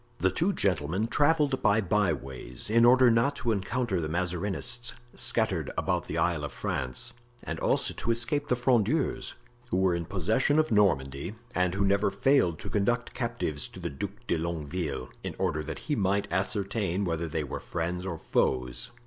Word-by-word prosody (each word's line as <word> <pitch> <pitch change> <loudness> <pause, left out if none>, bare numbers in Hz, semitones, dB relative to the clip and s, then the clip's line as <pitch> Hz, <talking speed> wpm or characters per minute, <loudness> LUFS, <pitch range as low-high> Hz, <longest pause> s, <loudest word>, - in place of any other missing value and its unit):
The 95 -3 +2
two 170 - +1
gentlemen 90 - 0
traveled 145 -2 +2
by 105 -1 +4
byways 80 - -1
in 115 +1 +6
order 125 0 +7
not 115 +5 +2
to 120 - -1
encounter 105 -1 -1
the 75 - -3
Mazarinists 90 +6 0 0.2
scattered - - +2
about - - 0
the 80 - -4
Isle 80 -2 +1
of 75 - -4
France, 65 - -3 0.3
and - - -4
also - - +1
to - - -5
escape 120 +5 +1
the 125 - +2
Frondeurs, 125 +3 +1 0.3
who 90 - 0
were 95 -1 +3
in 85 -1 -2
possession 110 - +1
of 155 -4 +2
Normandy 80 -4 +1 0.2
and 90 0 +1
who 100 0 +1
never 100 +1 +3
failed 100 - +2
to - - -6
conduct 120 +4 0
captives 115 - -2
to - - -12
the - - -4
Duc 95 +8 -5
de 85 - 0
Longueville, 80 -1 -3
in - - -4
order 75 - 0
that 80 - -5
he 150 - 0
might 100 -2 +1
ascertain 100 0 0
whether 85 -1 -1
they 80 0 -2
were 70 - -5
friends 90 +1 -3
or 90 -3 -4
foes. 65 - 0
95 Hz, 175 wpm, -28 LUFS, 85-120 Hz, 0.3 s, order